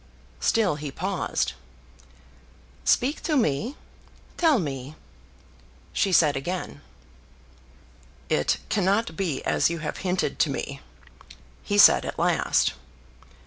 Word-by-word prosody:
Still 195 - +1
he 150 -1 -6
paused. 190 +6 -2 1.3
"Speak 275 +5 +2
to 305 -3 0
me. 225 - 0 0.6
Tell 320 -5 +3
me!" 140 - -4 1.0
she 195 - +1
said 155 -5 +4
again. 175 +7 -4 1.5
"It - - +1
cannot 200 -2 +1
be 165 -7 -2
as - - +2
you 170 - -3
have 155 -1 -5
hinted 185 -1 -2
to 155 - +3
me," 140 0 -5 0.8
he 205 - -2
said 205 - +7
at - - -5
last. - - +2
180 Hz, 105 wpm, -25 LUFS, 150-205 Hz, 1.5 s, said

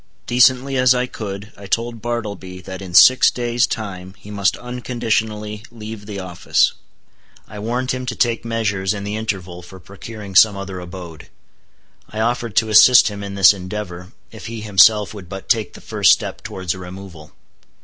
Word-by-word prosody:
Decently 130 +2 +3
as 130 0 +4
I 125 0 0
could, 105 -3 -7
I 100 - -11
told 115 +2 -2
Bartleby 100 -6 -5
that 95 +1 -8
in 90 -2 -7
six 130 +6 +7
days' 120 0 0
time 95 -3 -6
he 105 - -13
must 100 -2 0
unconditionally 110 -4 -3
leave 110 -2 -9
the 100 -2 -6
office. 90 -2 +1 0.8
I 105 - -10
warned 125 +4 -2
him 130 0 -4
to 125 - -3
take 120 -2 0
measures, 105 -4 -1
in 100 - -6
the 105 +1 -4
interval, 95 -5 -4
for 95 +1 -13
procuring 100 +3 -10
some 100 +1 +6
other 95 -1 -6
abode. 85 -3 -10 0.8
I 110 - -7
offered 115 -1 -1
to 110 -1 +2
assist 120 +3 +7
him 100 -1 -7
in 100 0 -6
this 100 0 +7
endeavor, 95 -1 -7 0.2
if 110 -3 -10
he 115 -1 -6
himself 105 0 +4
would 95 -5 -11
but 95 0 -8
take 110 -3 0
the - - -12
first - - +4
step - - -4
towards 95 -3 -4
a 95 - -10
removal. 90 -4 -11
105 Hz, 175 wpm, -19 LUFS, 95-115 Hz, 0.8 s, six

